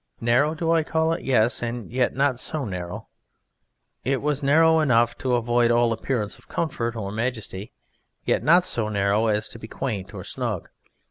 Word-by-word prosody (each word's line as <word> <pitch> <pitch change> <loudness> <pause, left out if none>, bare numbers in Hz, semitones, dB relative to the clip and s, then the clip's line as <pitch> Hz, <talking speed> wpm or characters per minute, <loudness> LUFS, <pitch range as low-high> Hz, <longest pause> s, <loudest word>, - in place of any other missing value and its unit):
Narrow 125 +7 +2
do 165 0 0
I 165 -1 +4
call 160 +1 0
it? 165 - -4
Yes 120 -3 +2
and 120 -1 -4
yet 125 0 0
not 135 -2 +1
so 150 -1 -2
narrow. 90 -3 -6 1.0
It 135 +1 0
was 150 0 -1
narrow 160 +3 +5
enough 120 -5 +3
to 125 -2 +1
avoid 120 0 +2
all 120 -1 +3
appearance 110 -3 -3
of - - -23
comfort 120 -8 -2
or 100 -3 -4
majesty, 110 -2 -4 0.5
yet - - +1
not 175 +4 +5
so 110 -2 -1
narrow 100 +2 +1
as 105 0 +1
to 115 - -9
be 110 - -9
quaint 110 -7 -4
or - - -8
snug. - - -4
120 Hz, 180 wpm, -24 LUFS, 110-145 Hz, 1.0 s, narrow